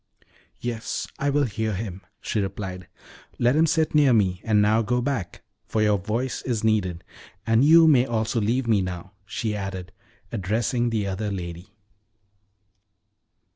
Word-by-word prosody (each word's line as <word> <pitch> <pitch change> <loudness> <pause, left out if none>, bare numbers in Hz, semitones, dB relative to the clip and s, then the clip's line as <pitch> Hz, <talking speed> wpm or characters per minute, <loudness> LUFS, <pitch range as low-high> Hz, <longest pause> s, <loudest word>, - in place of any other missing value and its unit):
"Yes, 120 -1 -4
I 145 - +1
will 145 +1 +2
hear 110 -2 -2
him," 95 -2 -5 0.2
she 110 - -2
replied. 95 -2 -4 0.5
"Let 120 +3 +3
him 160 +2 +4
sit 160 0 +1
near 145 -4 +5
me; 95 -5 +2
and 110 -2 +2
now 105 +2 +4
go 125 +3 0
back, 120 -9 -3 0.2
for 110 - 0
your 105 -1 +3
voice 115 +7 -2
is 120 -4 -2
needed. 95 -6 0 0.4
And 115 +2 +3
you 165 +3 +7
may 135 -4 +5
also 115 0 0
leave 120 +5 0
me 110 -4 +3
now," 90 0 -5 0.2
she 105 +1 -2
added, 95 -2 -5 0.4
addressing 115 +4 0
the 110 -3 -1
other 100 +2 -3
lady. 90 +2 -7
110 Hz, 150 wpm, -24 LUFS, 95-120 Hz, 0.5 s, you